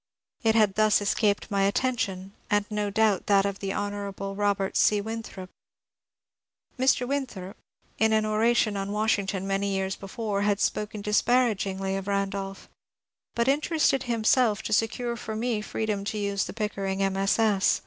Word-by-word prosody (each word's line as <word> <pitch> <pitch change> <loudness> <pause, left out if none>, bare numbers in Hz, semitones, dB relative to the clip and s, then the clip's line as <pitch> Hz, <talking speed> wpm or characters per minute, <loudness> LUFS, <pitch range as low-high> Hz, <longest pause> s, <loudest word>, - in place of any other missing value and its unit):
It 225 -3 +2
had 210 -3 +4
thus 215 +1 +3
escaped 205 0 0
my 200 -1 +1
attention, 195 -3 -1 0.2
and 205 0 +2
no 210 -1 -1
doubt 210 -2 +1
that 200 -1 +4
of 200 -1 -3
the 195 -1 -3
Hon. 205 +1 -2 0.4
Robert 200 -1 0
C. 210 - +4
Winthrop. 215 -3 -6 1.2
Mr. 255 -1 +2
Winthrop, 240 -9 -4 0.4
in 220 0 +3
an 215 0 +2
oration 215 0 +2
on 195 0 -3
Washington 205 -2 0
many 195 +1 -1
years 190 0 -1
be 195 - -10
fore, 210 -1 -2
had 205 -1 +1
spoken 210 -1 -2
disparagingly 210 -4 +1
of 195 0 -5
Randolph, 195 -1 -3 0.7
but 235 +1 +1
interested 290 -1 +2
himself 225 -1 +2
to 215 - -2
secure 235 +2 0
for 220 -2 -6
me 225 -1 -1
freedom 210 -1 -3
to 215 - -3
use 200 -2 -1
the - - -7
Pickering 200 -3 -3 0.2
MSS. 195 +1 +2
205 Hz, 150 wpm, -26 LUFS, 195-220 Hz, 1.2 s, had